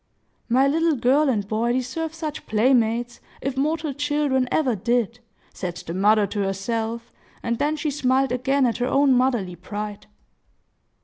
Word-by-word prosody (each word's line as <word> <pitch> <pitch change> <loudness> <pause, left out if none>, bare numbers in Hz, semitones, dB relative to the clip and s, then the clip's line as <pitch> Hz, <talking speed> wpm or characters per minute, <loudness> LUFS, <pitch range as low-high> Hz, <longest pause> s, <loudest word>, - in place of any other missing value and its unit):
"My 260 +3 +4
little 325 +2 +2
girl 270 +4 +3
and 205 -6 0
boy 225 +3 0
deserve 300 +6 -3
such 315 -2 -5
playmates, 235 +1 +2 0.2
if 275 -1 -3
mortal 305 +2 -1
children 290 -2 0
ever 265 -7 +2
did!" 235 +3 0 0.3
said 180 -2 -5
the 165 -1 -7
mother 205 +3 +4
to 205 +1 -4
herself; 225 +4 -2 0.3
and 235 -1 -1
then 300 +2 +1
she 300 0 -2
smiled 265 -2 +1
again 265 +2 +1
at 235 - 0
her 245 - -1
own 275 0 +4
motherly 245 -8 +1
pride. 205 +3 -6
250 Hz, 150 wpm, -23 LUFS, 220-280 Hz, 0.3 s, My